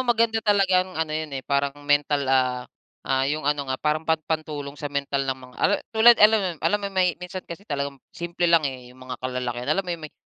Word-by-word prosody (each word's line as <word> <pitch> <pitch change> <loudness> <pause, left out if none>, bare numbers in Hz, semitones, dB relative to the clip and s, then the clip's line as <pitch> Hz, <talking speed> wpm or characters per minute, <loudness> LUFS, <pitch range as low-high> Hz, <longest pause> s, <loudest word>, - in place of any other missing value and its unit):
maganda 230 -2 +2
talagang 190 -3 +2
ano 160 -1 -1
yun, 155 0 -2
eh, 130 - -6
parang 140 0 0
mental, 145 0 +2
ah, 130 -2 +1 0.4
ah, 135 0 +1
yung 155 +1 -2
ano 145 -1 0
nga 130 - -1
parang 150 +2 0
pan 160 - +4
pantulong 150 -3 -3
sa 145 - -3
mental 140 -1 -2
ng 130 - 0 0.2
mga - - -18 0.4
tulad 230 +1 +7
alam 210 -5 +4
alam 210 - +3
mo - - -6
yun 195 - -14
may 185 -1 +4
minsan 180 +1 -7
kasi 180 +5 -10
talagang 140 -1 -3
simple 170 0 -2
lang, 165 -2 +4
eh, 130 -3 -5
yung - - -18
mga 130 0 -7
kalalakihan 125 0 -3
alam 195 +5 +1
mo 180 - -3
yung 165 -2 -6
may - - -39
155 Hz, 220 wpm, -24 LUFS, 140-185 Hz, 0.4 s, tulad